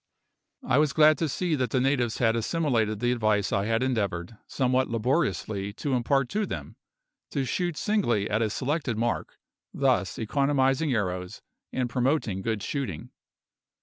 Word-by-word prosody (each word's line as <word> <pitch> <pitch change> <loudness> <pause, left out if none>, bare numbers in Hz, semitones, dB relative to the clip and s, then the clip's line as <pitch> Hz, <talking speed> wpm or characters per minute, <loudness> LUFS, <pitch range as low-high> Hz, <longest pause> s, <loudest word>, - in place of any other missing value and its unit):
I 130 +2 +4
was 150 -3 +2
glad 155 -1 +5
to 160 - 0
see 175 +4 -1
that 130 -4 0
the 130 - +1
natives 125 -3 +1
had 115 -2 +2
assimilated 115 -5 0
the 120 0 +2
advice 110 -5 +1
I 100 -1 +1
had 115 +2 +1
endeavoured, 100 -7 -1
somewhat 130 0 +1
laboriously, 115 -5 -1
to 135 +5 -3
impart 130 +2 +2
to 210 0 -1
them, - - -6 0.5
to 140 -3 -1
shoot 175 +3 -2
singly 150 - +1
at 105 +1 0
a 110 - +1
selected 130 0 -2
mark, 120 +1 -2 0.3
thus 125 -9 +1
economising 135 +4 +1
arrows, 90 -5 -2 0.3
and 130 -1 -1
promoting 125 -5 0
good 110 -1 -2
shooting. 120 - -4
125 Hz, 150 wpm, -27 LUFS, 110-140 Hz, 0.5 s, glad